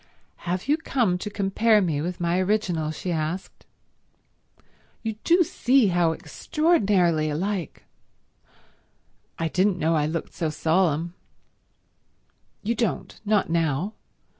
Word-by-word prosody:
"Have 180 +5 -2
you 295 +2 +3
come 235 - 0
to 210 - -4
compare 210 +2 +2
me 160 -7 0
with 175 +3 -4
my 175 +1 +1
original?" 185 -5 0
she 175 +3 -4
asked. 160 +3 -4 1.4
"You 225 -1 -2
do 350 +1 +5
see 255 - +3
how 175 -2 +2
extraordinarily 180 - +1
alike—" 180 +2 -3 1.5
"I 165 - -1
didn't 185 +3 +1
know 165 -1 +1
I 150 -1 +1
looked 165 +1 -4
so 160 - -2
solemn." 165 +1 +1 1.5
"You 225 +3 0
don't. 230 0 -3
Not 210 -5 +2
now. 165 +4 0
180 Hz, 115 wpm, -25 LUFS, 160-210 Hz, 1.5 s, do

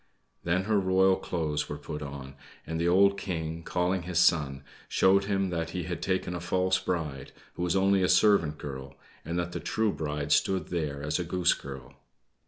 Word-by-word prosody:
Then 90 +2 +1
her 105 0 +2
royal 95 0 +4
clothes 80 -5 -2
were 75 - -4
put 75 +1 -7
on, 70 -2 -7 0.3
and 80 0 -3
the 85 - +1
old 100 +2 +4
King, 80 -3 -4
calling 90 +2 0
his 90 0 -4
son, 75 -6 +3 0.3
showed 100 +1 +4
him 95 -2 0
that 85 -1 -2
he 90 - -2
had 85 0 -5
taken 95 -1 -1
a 90 - -3
false 90 +1 +1
bride, 75 -7 -3 0.2
who - - -7
was 90 0 +1
only 95 0 +3
a 90 - +2
servant 85 -8 +4
girl, 70 -1 -7 0.3
and 85 +3 -3
that 85 0 -2
the - - -4
true 110 -1 0
bride 75 -2 -3
stood 95 -4 +2
there 75 -5 -3
as 75 +2 -1
a - - 0
Goose 90 +1 +2
Girl. 65 -2 -9
85 Hz, 190 wpm, -28 LUFS, 75-95 Hz, 0.3 s, royal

